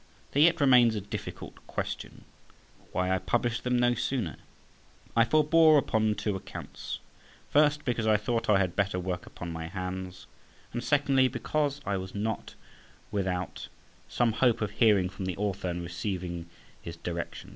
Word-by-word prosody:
There 145 Hz, -, +2 dB
yet 170 Hz, +2 st, +5 dB
remains 125 Hz, -5 st, +6 dB
a 105 Hz, -, -2 dB
difficult 100 Hz, -, -7 dB
question—why 90 Hz, +1 st, -5 dB
I 95 Hz, -, +1 dB
published 120 Hz, +3 st, 0 dB
them 125 Hz, 0 st, +1 dB
no 120 Hz, 0 st, +3 dB
sooner? 120 Hz, -, -2 dB, 0.8 s
I 115 Hz, -, +6 dB
forbore 155 Hz, +4 st, +5 dB
upon 110 Hz, -5 st, +2 dB
two 100 Hz, 0 st, -2 dB
accounts. 95 Hz, -, -7 dB, 0.5 s
First, 150 Hz, 0 st, +3 dB
because 120 Hz, -3 st, 0 dB
I 110 Hz, -1 st, +5 dB
thought 115 Hz, +2 st, -1 dB
I 105 Hz, -, +6 dB
had 95 Hz, -3 st, 0 dB
better 100 Hz, -2 st, 0 dB
work 90 Hz, -1 st, -4 dB
upon 85 Hz, -1 st, -7 dB
my 80 Hz, 0 st, -5 dB
hands; 90 Hz, 0 st, -5 dB, 0.5 s
and 120 Hz, 0 st, -3 dB
secondly, 140 Hz, -2 st, +3 dB
because 140 Hz, +3 st, -1 dB
I 100 Hz, -, 0 dB
was 95 Hz, +1 st, -7 dB
not 110 Hz, +2 st, -3 dB, 0.6 s
without 95 Hz, -3 st, -2 dB, 0.4 s
some 120 Hz, -2 st, +1 dB
hope 120 Hz, +1 st, +2 dB
of 105 Hz, -2 st, -1 dB
hearing 105 Hz, -4 st, +4 dB
from 95 Hz, +1 st, -6 dB
the 95 Hz, -1 st, -3 dB
Author 100 Hz, -2 st, -2 dB
and 85 Hz, 0 st, -3 dB
receiving 85 Hz, -2 st, -4 dB, 0.3 s
his 85 Hz, 0 st, -8 dB
directions. 85 Hz, 0 st, -5 dB
105 Hz, 155 wpm, -29 LUFS, 95-125 Hz, 0.8 s, remains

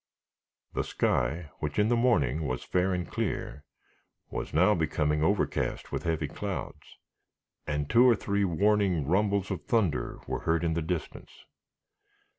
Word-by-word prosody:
The -, -, 0 dB
sky, 75 Hz, +6 st, -1 dB
which 75 Hz, -1 st, -3 dB
in 105 Hz, +1 st, +3 dB
the 120 Hz, -, +3 dB
morning 80 Hz, -, +2 dB
was 65 Hz, -1 st, -3 dB
fair 90 Hz, +1 st, +1 dB
and 90 Hz, -1 st, -2 dB
clear, 70 Hz, +4 st, -3 dB, 0.7 s
was -, -, -4 dB
now 90 Hz, +8 st, +4 dB
becoming 75 Hz, -3 st, 0 dB
overcast 100 Hz, +5 st, 0 dB
with -, -, -3 dB
heavy 80 Hz, -3 st, 0 dB
clouds, -, -, -6 dB, 0.7 s
and 75 Hz, -1 st, -1 dB
two 120 Hz, -, +6 dB
or 120 Hz, -, +5 dB
three 100 Hz, -1 st, -1 dB
warning 95 Hz, -2 st, +2 dB
rumbles 100 Hz, +4 st, +1 dB
of -, -, -4 dB
thunder 110 Hz, -, 0 dB
were -, -, -3 dB
heard 85 Hz, 0 st, 0 dB
in 80 Hz, -1 st, +1 dB
the 85 Hz, -, -1 dB
distance. 80 Hz, +1 st, -5 dB
85 Hz, 145 wpm, -29 LUFS, 75-100 Hz, 0.7 s, two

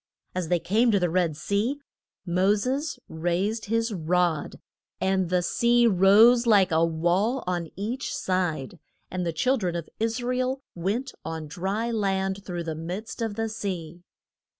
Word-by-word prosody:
] -, -, -52 dB
As 180 Hz, -2 st, -2 dB
they 175 Hz, +1 st, +2 dB
came 210 Hz, +8 st, +2 dB
to 205 Hz, -3 st, +3 dB
the 175 Hz, -2 st, 0 dB
Red 170 Hz, -4 st, +1 dB
Sea, 205 Hz, -, 0 dB, 0.5 s
Mo 185 Hz, +3 st, +3 dB
ses 265 Hz, +8 st, -2 dB
raised 180 Hz, +7 st, -1 dB
his 230 Hz, +1 st, 0 dB
rod 175 Hz, -2 st, 0 dB, 0.4 s
and 190 Hz, -2 st, +1 dB
the 180 Hz, 0 st, +1 dB
sea 235 Hz, +5 st, +3 dB
rose 225 Hz, +4 st, +6 dB
like 200 Hz, -5 st, +5 dB
a 160 Hz, +1 st, +3 dB
wall 175 Hz, +10 st, +1 dB
on 175 Hz, -2 st, -2 dB
each 230 Hz, +8 st, -3 dB
side, 175 Hz, -5 st, -2 dB, 0.3 s
and 180 Hz, -1 st, -2 dB
the -, -, +1 dB
chil 255 Hz, +12 st, +1 dB
dren 180 Hz, -6 st, -2 dB
of 170 Hz, -2 st, -4 dB
Is 225 Hz, +2 st, -1 dB
ra 250 Hz, +1 st, 0 dB
el 255 Hz, +2 st, -1 dB
went 210 Hz, +10 st, -2 dB
on 160 Hz, -1 st, -5 dB
dry 195 Hz, +8 st, -2 dB
land 195 Hz, -2 st, -1 dB
through 175 Hz, -3 st, -4 dB
the 165 Hz, -1 st, -3 dB
midst 180 Hz, +10 st, -6 dB
of 225 Hz, -3 st, -2 dB
the 225 Hz, +1 st, -1 dB
sea. 180 Hz, -6 st, -5 dB
190 Hz, 170 wpm, -26 LUFS, 175-225 Hz, 0.5 s, rose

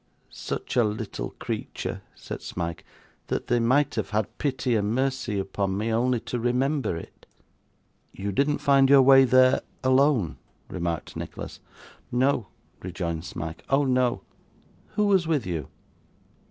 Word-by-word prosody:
'Such -, -, -5 dB
a 120 Hz, -, +5 dB
little 105 Hz, 0 st, -4 dB
creature,' -, -, -4 dB
said -, -, -7 dB
Smike, 85 Hz, -2 st, -5 dB, 0.4 s
'that -, -, -2 dB
they 120 Hz, -, +2 dB
might 130 Hz, +5 st, +2 dB
have -, -, -2 dB
had 105 Hz, -1 st, -1 dB
pity 130 Hz, -4 st, 0 dB
and 105 Hz, +1 st, 0 dB
mercy 130 Hz, -5 st, -1 dB
upon 95 Hz, 0 st, -2 dB
me, 110 Hz, +2 st, -1 dB
only 125 Hz, +2 st, +2 dB
to 120 Hz, -, -4 dB
remember 125 Hz, -, 0 dB
it.' -, -, -12 dB, 0.8 s
'You 100 Hz, +1 st, -4 dB
didn't 140 Hz, +8 st, +1 dB
find 135 Hz, -1 st, +4 dB
your 140 Hz, -1 st, +8 dB
way 135 Hz, 0 st, +8 dB
there, 130 Hz, 0 st, +5 dB, 0.2 s
alone!' 130 Hz, -, +3 dB, 0.3 s
remarked 85 Hz, -3 st, -3 dB
Nicholas. -, -, -7 dB, 0.5 s
'No,' 125 Hz, -3 st, +1 dB, 0.3 s
rejoined 85 Hz, -2 st, -4 dB
Smike, 80 Hz, -2 st, -6 dB
'oh 135 Hz, +2 st, +3 dB
no.' 125 Hz, -2 st, +1 dB, 0.7 s
'Who 210 Hz, -, +2 dB
was 190 Hz, -5 st, +3 dB
with 150 Hz, -8 st, +1 dB
you? 80 Hz, -6 st, -3 dB
120 Hz, 140 wpm, -26 LUFS, 100-135 Hz, 0.8 s, your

